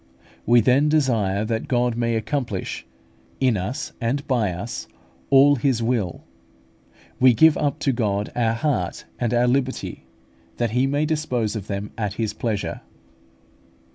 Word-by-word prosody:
We 120 Hz, +1 st, +6 dB
then 130 Hz, +6 st, +3 dB
desire 110 Hz, -10 st, +1 dB
that 115 Hz, 0 st, -2 dB
God 120 Hz, -2 st, +1 dB
may 115 Hz, -1 st, 0 dB
accomplish, 110 Hz, -2 st, -3 dB, 0.5 s
in 130 Hz, -4 st, +3 dB
us 105 Hz, +10 st, -4 dB
and 135 Hz, +5 st, -1 dB
by 115 Hz, -7 st, +1 dB
us, 90 Hz, +7 st, -6 dB, 0.4 s
all 140 Hz, +1 st, +6 dB
His 125 Hz, -2 st, +1 dB
will; 115 Hz, -7 st, -1 dB, 1.0 s
we 130 Hz, -2 st, +6 dB
give 160 Hz, +6 st, +6 dB
up 145 Hz, -2 st, -1 dB
to 140 Hz, -, +2 dB
God 105 Hz, -4 st, -1 dB
our 115 Hz, -2 st, +1 dB
heart 115 Hz, -, -2 dB
and 120 Hz, -2 st, 0 dB
our 120 Hz, 0 st, +3 dB
liberty, 130 Hz, +1 st, -2 dB, 0.5 s
that 120 Hz, -2 st, 0 dB
He 125 Hz, +3 st, +2 dB
may 145 Hz, +2 st, +1 dB
dispose 125 Hz, -8 st, -1 dB
of 105 Hz, -2 st, -5 dB
them 100 Hz, +1 st, -4 dB
at 105 Hz, -3 st, -1 dB
His 110 Hz, -2 st, -2 dB
pleasure. 105 Hz, -2 st, -3 dB
120 Hz, 145 wpm, -23 LUFS, 110-135 Hz, 1.0 s, We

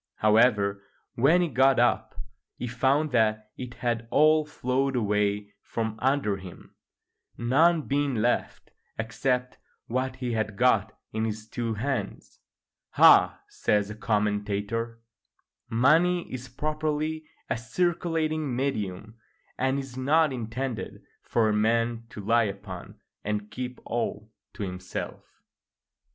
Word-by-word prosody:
However, 105 Hz, -2 st, +3 dB, 0.3 s
when 160 Hz, +9 st, +4 dB
he -, -, +1 dB
got 130 Hz, -1 st, +4 dB
up 120 Hz, +1 st, +1 dB, 0.4 s
he -, -, -4 dB
found 135 Hz, +5 st, +1 dB
that 110 Hz, -2 st, +1 dB
it 125 Hz, -1 st, -7 dB
had 115 Hz, -1 st, -2 dB
all 155 Hz, +2 st, +4 dB
flowed 135 Hz, -1 st, -1 dB
away 105 Hz, -2 st, 0 dB
from 110 Hz, -1 st, -4 dB
under 130 Hz, -6 st, +1 dB
him, 95 Hz, -2 st, -12 dB, 0.6 s
none 155 Hz, +7 st, +3 dB
being 140 Hz, -1 st, 0 dB
left 115 Hz, +2 st, -1 dB, 0.3 s
except 125 Hz, +3 st, -1 dB, 0.3 s
what 130 Hz, +2 st, -2 dB
he 125 Hz, -2 st, -3 dB
had 105 Hz, -2 st, -2 dB
got 110 Hz, -3 st, +2 dB, 0.2 s
in 110 Hz, +1 st, 0 dB
his 110 Hz, 0 st, -4 dB
two 115 Hz, -1 st, -3 dB
hands. 135 Hz, +5 st, -4 dB, 0.6 s
["Ah!" -, -, +7 dB
says 105 Hz, -1 st, 0 dB
the 105 Hz, -, -6 dB
commentator, 105 Hz, +2 st, -1 dB, 0.7 s
"money 165 Hz, +10 st, +3 dB
is 130 Hz, 0 st, -6 dB
properly 155 Hz, +3 st, -2 dB, 0.2 s
a -, -, 0 dB
circulating 155 Hz, +2 st, -1 dB
medium, 110 Hz, -4 st, -3 dB, 0.4 s
and 130 Hz, +1 st, 0 dB
is 135 Hz, -2 st, -6 dB
not 150 Hz, +3 st, +3 dB
intended 120 Hz, +1 st, -4 dB, 0.2 s
for 115 Hz, -2 st, +1 dB
a 105 Hz, -, +2 dB
man 115 Hz, +2 st, +1 dB
to 105 Hz, -3 st, -9 dB
lie 115 Hz, +1 st, +4 dB
upon 100 Hz, -3 st, -7 dB, 0.2 s
and 105 Hz, 0 st, -3 dB
keep 125 Hz, +2 st, -5 dB
all 110 Hz, -2 st, -3 dB, 0.2 s
to -, -, -4 dB
himself." 90 Hz, -1 st, -7 dB
120 Hz, 120 wpm, -27 LUFS, 105-135 Hz, 0.7 s, Ah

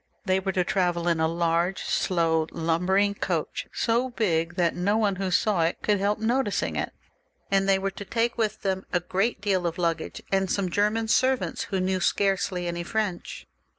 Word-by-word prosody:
They 190 Hz, 0 st, +2 dB
were 190 Hz, 0 st, -2 dB
to 180 Hz, -, +2 dB
travel 175 Hz, -2 st, 0 dB
in 170 Hz, -2 st, +2 dB
a 160 Hz, -, +3 dB
large, 170 Hz, +2 st, 0 dB
slow, 165 Hz, -3 st, +1 dB
lumbering 180 Hz, +5 st, +1 dB
coach, 175 Hz, -5 st, -3 dB
so 240 Hz, +3 st, +1 dB
big, 175 Hz, -8 st, 0 dB
that 175 Hz, -2 st, +1 dB
no 200 Hz, +4 st, +1 dB
one 205 Hz, -4 st, +1 dB
who 195 Hz, -1 st, -1 dB
saw 190 Hz, 0 st, +2 dB
it 165 Hz, +1 st, -1 dB
could 205 Hz, -2 st, +2 dB
help 205 Hz, +2 st, +1 dB
noticing 235 Hz, -1 st, 0 dB
it, -, -, -2 dB, 0.6 s
and 195 Hz, 0 st, +2 dB
they 195 Hz, -, +5 dB
were 195 Hz, 0 st, -2 dB
to 205 Hz, -, -8 dB
take 230 Hz, +3 st, 0 dB
with 215 Hz, -2 st, -2 dB
them 190 Hz, -1 st, -1 dB
a 180 Hz, -, +2 dB
great 195 Hz, +4 st, -1 dB
deal 190 Hz, -4 st, +1 dB
of 170 Hz, -, -4 dB
luggage 170 Hz, -2 st, -2 dB
and 195 Hz, -1 st, +1 dB
some 190 Hz, -3 st, 0 dB
German 210 Hz, +4 st, +1 dB
servants, 260 Hz, +3 st, +1 dB
who 195 Hz, -, -2 dB
knew 185 Hz, 0 st, 0 dB
scarcely 190 Hz, -1 st, 0 dB
any 175 Hz, 0 st, -3 dB
French. 195 Hz, 0 st, -3 dB
190 Hz, 185 wpm, -26 LUFS, 175-205 Hz, 0.6 s, they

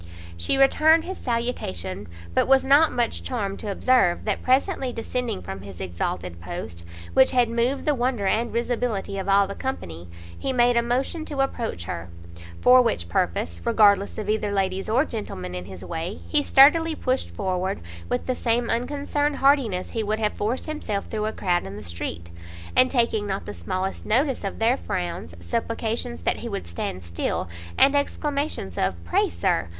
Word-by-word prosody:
She 85 Hz, -, +1 dB
returned 310 Hz, +4 st, +5 dB
his 375 Hz, +2 st, -6 dB
salutation, 105 Hz, -, -3 dB, 0.3 s
but -, -, +2 dB
was 270 Hz, 0 st, +5 dB
not 285 Hz, +4 st, +6 dB
much 240 Hz, -1 st, 0 dB
charmed 200 Hz, -6 st, -3 dB
to 210 Hz, -, -3 dB
observe, 225 Hz, -5 st, +2 dB
that 210 Hz, -2 st, -1 dB
presently 260 Hz, 0 st, +1 dB
descending 235 Hz, -2 st, -3 dB
from 95 Hz, 0 st, -6 dB
his 95 Hz, -2 st, -10 dB
exalted 85 Hz, -1 st, -4 dB
post, 85 Hz, 0 st, -6 dB, 0.3 s
which 265 Hz, 0 st, +6 dB
had 250 Hz, -2 st, +3 dB
moved 240 Hz, +4 st, 0 dB
the 300 Hz, -, +3 dB
wonder 245 Hz, -5 st, 0 dB
and 225 Hz, +4 st, +1 dB
risibility 235 Hz, -4 st, -1 dB
of 195 Hz, -, -3 dB
all 200 Hz, 0 st, +5 dB
the 200 Hz, -, -5 dB
company, 85 Hz, -, -5 dB, 0.3 s
he 270 Hz, -, -2 dB
made 245 Hz, -1 st, +3 dB
a 235 Hz, -, +4 dB
motion 260 Hz, +7 st, -1 dB
to 285 Hz, -3 st, -2 dB
approach 235 Hz, -, -2 dB
her; 85 Hz, 0 st, -5 dB, 0.5 s
for 255 Hz, 0 st, +8 dB
which 85 Hz, -, -1 dB
purpose, 85 Hz, 0 st, -1 dB
regardless 200 Hz, -, +4 dB
of 215 Hz, -2 st, -4 dB
either 210 Hz, -1 st, 0 dB
ladies 195 Hz, 0 st, -1 dB
or 250 Hz, +7 st, +3 dB
gentlemen 95 Hz, -, -5 dB
in 90 Hz, 0 st, -5 dB
his 95 Hz, -1 st, -9 dB
way, 165 Hz, -, -4 dB
he 300 Hz, -, +2 dB
sturdily 310 Hz, +4 st, +6 dB
pushed 255 Hz, -2 st, -1 dB
forward, 185 Hz, -1 st, -2 dB, 0.3 s
with 125 Hz, -, -1 dB
the 255 Hz, -, 0 dB
same 235 Hz, -1 st, 0 dB
unconcerned 285 Hz, +4 st, 0 dB
hardiness 265 Hz, -11 st, +2 dB
he 225 Hz, -, -1 dB
would 215 Hz, 0 st, -1 dB
have 215 Hz, -1 st, 0 dB
forced 225 Hz, +5 st, -2 dB
himself 235 Hz, -10 st, -3 dB
through 215 Hz, -1 st, -1 dB
a -, -, -1 dB
crowd 180 Hz, -4 st, 0 dB
in 95 Hz, +1 st, -7 dB
the 105 Hz, -, -8 dB
street; 85 Hz, -1 st, -5 dB, 0.4 s
and 255 Hz, -, +5 dB
taking 230 Hz, -5 st, +1 dB
not 195 Hz, -1 st, -3 dB
the 105 Hz, -, -6 dB
smallest 185 Hz, -, -3 dB
notice 260 Hz, +3 st, +1 dB
of 195 Hz, -, -4 dB
their 230 Hz, +4 st, +3 dB
frowns, 170 Hz, -, -4 dB
supplications 220 Hz, -, -3 dB
that -, -, +1 dB
he -, -, -6 dB
would 90 Hz, -, -4 dB
stand 85 Hz, +1 st, -5 dB
still, 85 Hz, +1 st, -2 dB, 0.3 s
and 280 Hz, -, +6 dB
exclamations 285 Hz, -, -2 dB
of 95 Hz, -1 st, +1 dB
"Pray, 85 Hz, -, +1 dB
Sir!" 85 Hz, +1 st, 0 dB
215 Hz, 175 wpm, -24 LUFS, -, 0.5 s, for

